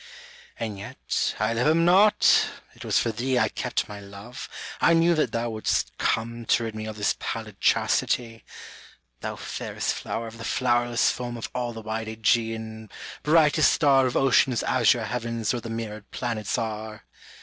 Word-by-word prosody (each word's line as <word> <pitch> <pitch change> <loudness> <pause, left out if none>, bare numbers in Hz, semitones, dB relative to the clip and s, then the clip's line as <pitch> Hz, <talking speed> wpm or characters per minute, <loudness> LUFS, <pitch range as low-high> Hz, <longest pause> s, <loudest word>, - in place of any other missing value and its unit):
And 110 -4 -4
yet 100 - -2
I 110 +2 +1
love 115 +4 +1
him 165 +2 +4
not, 195 +4 +5 0.3
it - - -12
was - - +1
for 115 - +1
thee 125 +4 -1
I - - +3
kept - - -2
my 105 -1 -8
love, 100 +5 -10 0.3
I 170 - +5
knew 165 +1 +4
that 155 -7 +1
thou 115 0 -2
would'st 110 -1 -1
come 115 +1 -1
To 120 - +3
rid 115 -1 -4
me 110 0 -6
of 110 0 -6
this 105 - +1
pallid 110 -3 -5
chastity; 115 -2 +1 0.8
Thou - - -4
fairest - - -3
flower 115 - -4
of 115 0 -10
the - - -7
flowerless 120 -1 +2
foam 120 -1 -5
Of 115 - -6
all 125 -1 -2
the 115 -1 -9
wide 110 +1 -4
^Egean, 110 0 -1 0.3
brightest 155 -1 +4
star 135 -4 +4
Of 125 - -1
ocean's 130 -2 +3
azure 120 -2 +3
heavens 115 -2 -2
where 120 - -3
the 115 - -7
mirrored 110 -2 -6
planets 110 -6 -3
are! 110 -1 -5
115 Hz, 170 wpm, -25 LUFS, 110-125 Hz, 0.8 s, not